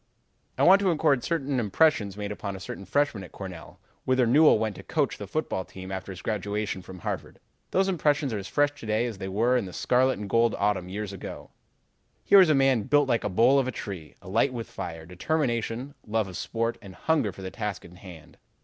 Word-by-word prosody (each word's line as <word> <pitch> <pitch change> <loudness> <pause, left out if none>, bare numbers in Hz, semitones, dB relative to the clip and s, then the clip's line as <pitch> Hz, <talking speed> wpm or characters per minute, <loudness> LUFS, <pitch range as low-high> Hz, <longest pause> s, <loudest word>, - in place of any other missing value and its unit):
"I - - +2
want 190 +3 +8
to 200 - 0
record 150 -6 +2
certain 140 -5 -1
impressions 105 - +2
made 105 0 -4
upon 100 -1 -5
a - - -7
certain 100 +1 -7
freshman 130 -1 0
at 90 - -11
Cornell, 95 -4 -9 0.2
whither 130 -1 +2
Newell 145 +3 +6
went 110 -2 -2
to - - -8
coach - - -1
the - - -6
football 95 - -2
team 95 +1 -10
after 95 +1 -5
his 90 - -9
graduation 105 -2 -2
from 90 +1 -11
Harvard. 85 - -5 0.3
Those 190 +1 +2
impressions 150 -7 +1
are 105 - -2
as 95 - -7
fresh 145 +8 +2
to 110 - -8
day 110 +2 +1
as 115 -5 -5
they 95 - -4
were 115 +6 +2
in 120 -5 +1
that 90 - -9
scarlet 130 0 +2
and 105 0 -6
gold 115 +2 +2
autumn 100 -3 0
years 100 +1 -5
ago. 95 - -8 0.7
"Here 200 - +7
was 185 -4 +7
a 155 - +5
man 135 -3 +3
built 145 +6 +3
like 120 -3 +2
the 105 - -2
bole 120 +8 +4
of 130 - 0
a - - -1
tree, 95 -9 -7
alight 115 +8 +1
with 115 -2 -5
fire, 80 -4 -7
determination, 120 - -2
love 110 -1 0
of 95 - -9
sport, 115 +5 -2
and 95 -4 -11
hunger 155 -10 +1
for 95 - -11
the 95 - -5
task 105 -3 -4
in 90 +1 -14
hand. 85 -4 -13
110 Hz, 220 wpm, -27 LUFS, 95-135 Hz, 0.7 s, want